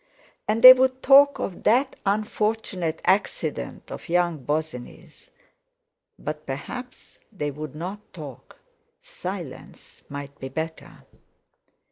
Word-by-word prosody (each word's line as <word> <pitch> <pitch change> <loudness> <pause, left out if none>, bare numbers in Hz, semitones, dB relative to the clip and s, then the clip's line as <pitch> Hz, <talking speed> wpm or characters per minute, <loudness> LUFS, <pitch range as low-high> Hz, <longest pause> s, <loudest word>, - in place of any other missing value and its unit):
And 215 +2 0
they 255 0 +14
would 260 0 +1
talk 280 +1 +7
of 185 - -5
"that 260 +5 +2
unfortunate 210 -5 -1
accident 195 +2 -1
of - - -8
young 175 -2 +1
Bosinney's," 155 +2 -5 0.9
but 150 0 -6
perhaps 250 - -8
they 150 -8 -3
would 150 0 -8
not 180 +6 -5
talk—silence 145 -7 -10
might 140 0 -8
be 135 - -6
better! 160 +3 -6
175 Hz, 100 wpm, -24 LUFS, 150-220 Hz, 0.9 s, they